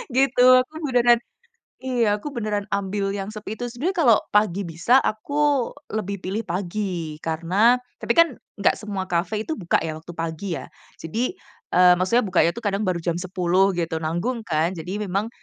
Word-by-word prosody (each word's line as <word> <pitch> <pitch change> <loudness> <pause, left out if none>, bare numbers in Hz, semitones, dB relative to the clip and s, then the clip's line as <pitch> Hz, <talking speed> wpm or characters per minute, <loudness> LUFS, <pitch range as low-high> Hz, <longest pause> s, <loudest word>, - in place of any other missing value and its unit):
gitu. 265 -2 +3 0.2
Aku 305 - -22
beneran 240 -2 +4 0.7
Iya. 235 -5 +1
Aku 295 - -5
beneran 210 -3 -2
ambil 195 0 -1
yang 195 0 -4
sepi 215 0 -7
itu. - - -2
Sebenernya 295 +11 -3
kalau 225 -3 +7 0.2
pagi 210 -2 +2
bisa, 170 +10 +2
aku 285 +4 0 0.2
lebih 200 -2 -2
pilih 195 +4 -3
pagi. 180 -3 -3
Karena 180 +9 +3 0.2
tapi - - +1
kan 335 -7 +5 0.2
nggak - - +3
semua 200 -3 -4
cafe 190 +5 -1
itu 320 - -4
buka 175 -5 +1
ya 160 - -2
waktu 165 +2 -10
pagi 165 +3 -4
ya. - - -9 0.4
Jadi, 225 - -2 0.4
eee, 180 0 +7
maksudnya 215 +6 +2
bukanya 175 -3 +2
itu - - -5
kadang 205 +1 0
baru 175 -2 0
jam 170 -1 0
10.00, 185 +1 +1
gitu. 165 -2 -1
Nanggung 175 +10 -2
kan, 160 +2 +1
jadi 175 +4 -5
memang, 200 +1 -1
200 Hz, 170 wpm, -23 LUFS, 175-235 Hz, 0.7 s, kalau